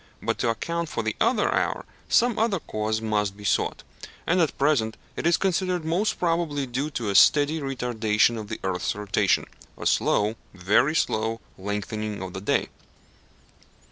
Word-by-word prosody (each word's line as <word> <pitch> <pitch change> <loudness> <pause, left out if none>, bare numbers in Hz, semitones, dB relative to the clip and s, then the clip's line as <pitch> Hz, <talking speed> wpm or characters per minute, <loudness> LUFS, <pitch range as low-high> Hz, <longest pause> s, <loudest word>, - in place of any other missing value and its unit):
But - - -2
to 120 - +1
account 170 +8 -2
for 115 - -3
the 110 -1 -2
other - - +2
hour - - -1 0.2
some 240 -2 +3
other 215 -4 +1
cause 110 -4 -2
must 105 -3 -1
be 105 - -11
sought, - - 0 0.4
and 180 +1 +2
at 160 - 0
present 135 -6 +1 0.2
it - - -1
is 170 - +4
considered 185 -2 0
most 180 +7 0
probably 165 -5 0
due 135 +4 -2
to 120 -8 -3
a - - -2
steady 145 +9 +5
retardation 120 -5 +1
of 105 - -7
the - - -5
earth's 95 0 -1
rotation 105 -1 +1 0.3
a - - -7
slow, 105 +2 +2 0.2
very 100 - +2
slow, 110 -5 0 0.2
lengthening 105 +1 -4
of 95 -1 -7
the 95 - -6
day. 100 - 0
115 Hz, 165 wpm, -25 LUFS, 105-160 Hz, 0.4 s, steady